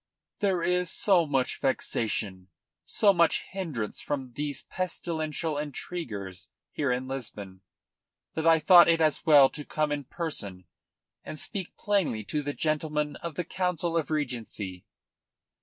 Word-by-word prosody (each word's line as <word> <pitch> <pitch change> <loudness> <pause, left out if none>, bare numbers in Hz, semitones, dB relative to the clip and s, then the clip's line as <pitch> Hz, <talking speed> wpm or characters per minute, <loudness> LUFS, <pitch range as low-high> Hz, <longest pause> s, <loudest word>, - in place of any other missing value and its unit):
"There 190 -5 +1
is 180 0 +1
so 180 -4 +3
much 135 -3 0
vexation, 105 -7 -1 0.4
so 205 -2 +4
much 170 -2 +3
hindrance 155 - -4
from 135 -4 -4
these 145 +2 -4
pestilential 160 -4 -3
intriguers 110 - -5 0.2
here 140 -4 0
in 125 +1 -1
Lisbon, 105 -8 -6 0.7
that 160 +1 -1
I 165 - +8
have 160 - -3
thought 175 +1 +9
it 165 -1 +4
as 155 -2 +2
well 145 -3 +8
to 150 - -7
come 150 +1 -1
in 145 -1 -2
person 105 - -4 0.6
and 155 - -7
speak 190 +2 -4
plainly 195 - 0
to 150 +8 -2
the 145 0 -3
gentlemen 150 -1 -1
of 170 -3 -6
the 180 - -1
Council 180 -1 -1
of 160 -4 0
Regency." 115 - -3
150 Hz, 140 wpm, -28 LUFS, 125-170 Hz, 0.7 s, thought